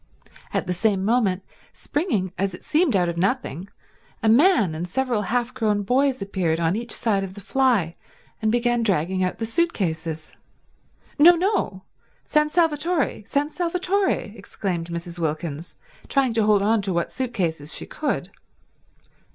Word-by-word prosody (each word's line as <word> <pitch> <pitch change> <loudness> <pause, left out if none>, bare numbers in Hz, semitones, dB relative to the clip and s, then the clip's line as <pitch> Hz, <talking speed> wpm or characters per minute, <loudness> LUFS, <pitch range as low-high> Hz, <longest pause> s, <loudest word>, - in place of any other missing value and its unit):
At - - -1
the 180 - -1
same 195 0 +1
moment, 205 -5 +1 0.3
springing 215 - -2
as 195 -2 -1
it - - -15
seemed 305 - +2
out 180 -2 +3
of 170 0 -3
nothing, 195 - -1 0.5
a 220 - +4
man 235 - +5
and 165 +3 -4
several 255 -3 0
half 245 +1 0
grown 215 -4 0
boys 260 +1 +1
appeared 180 -5 -1
on 165 +2 +1
each 235 +1 -5
side 200 -4 0
of 190 0 -7
the - - -8
fly 225 - +1 0.5
and 220 -1 +2
began 240 0 +1
dragging 185 -3 +1
out 185 - -1
the 225 - -3
suit 335 +9 0
cases. 160 -4 -3 0.8
"No, 340 +4 +9
no—San 300 - -2
Salvatore, 325 -4 +1
San 290 +4 0
Salvatore"—exclaimed 335 - -1
Mrs. 170 0 -6
Wilkins, 160 0 -3 0.3
trying 270 -4 +2
to 220 -2 +2
hold 205 -2 +4
on 220 +1 +3
to 195 -2 -2
what 170 0 -1
suit 260 -2 -3
cases 160 -9 -2
she - - -4
could. - - -3
210 Hz, 150 wpm, -23 LUFS, 180-265 Hz, 0.8 s, No